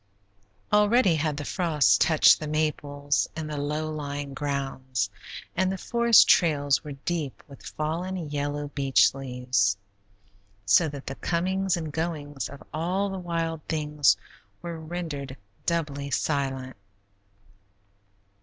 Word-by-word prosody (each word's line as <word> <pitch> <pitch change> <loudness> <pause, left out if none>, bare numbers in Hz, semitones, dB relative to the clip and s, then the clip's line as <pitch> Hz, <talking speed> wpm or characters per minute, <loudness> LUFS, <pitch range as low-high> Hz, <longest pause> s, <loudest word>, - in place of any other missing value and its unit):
Already 210 -1 +5
had 155 -2 -1
the 145 - -4
frost 150 - +2
touched 160 -1 +6
the 155 - -5
maples 145 -2 0
in 160 - -3
the 155 0 -5
low 150 +2 -2
lying 145 -2 -5
grounds, 135 -6 -2 0.4
and 185 +1 +1
the 190 - -3
forest 235 +2 +5
trails 145 -4 +3
were 150 -2 -6
deep 150 0 -4
with 140 -2 -14
fallen, 165 +5 -3 0.2
yellow 145 0 -2
beech 135 -2 +3
leaves, 125 -6 0 0.9
so 100 +12 +5
that 140 -1 -8
the 135 - -4
comings 185 +4 0
and 160 -3 -4
goings 145 -6 -3
of 140 - -11
all 185 +6 -1
the 190 - -4
wild 165 -2 -2
things 150 -8 +2 0.5
were 170 -1 -5
rendered 155 -5 -5 0.3
doubly 145 -4 -1
silent. 135 -2 -1
150 Hz, 125 wpm, -26 LUFS, 140-170 Hz, 0.9 s, touched